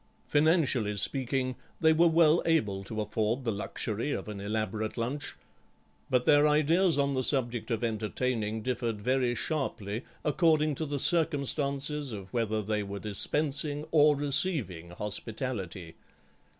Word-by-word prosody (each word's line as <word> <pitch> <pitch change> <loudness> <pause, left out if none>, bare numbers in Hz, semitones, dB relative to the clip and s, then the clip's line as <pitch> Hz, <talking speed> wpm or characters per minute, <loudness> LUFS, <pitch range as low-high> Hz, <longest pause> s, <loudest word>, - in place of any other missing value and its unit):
Financially 145 - +2
speaking, 130 +3 -1 0.2
they 160 -1 +5
were 170 +2 +5
well 165 0 +4
able 105 -12 +1
to 110 +2 -4
afford 110 +4 -1
the 115 - +1
luxury 110 +5 -3
of - - -4
an 105 -2 -6
elaborate 110 +1 -3
lunch, 130 +6 -2 0.7
but 125 -1 +2
their 145 0 +5
ideas 155 +3 +3
on 140 -1 +1
the 130 - 0
subject 125 -4 0
of 115 -1 -2
entertaining 110 0 -2
differed 120 -3 -2
very 125 +2 +1
sharply, 120 -8 -2 0.2
according 155 -1 +3
to 155 +3 -4
the 145 0 -2
circumstances 145 -2 +1
of 95 -2 -8
whether 110 -3 0
they 105 +1 -1
were 100 0 -5
dispensing 145 +8 -1
or 150 -1 +5
receiving 135 - -1
hospitality. 100 -2 -4
130 Hz, 135 wpm, -29 LUFS, 110-150 Hz, 0.7 s, they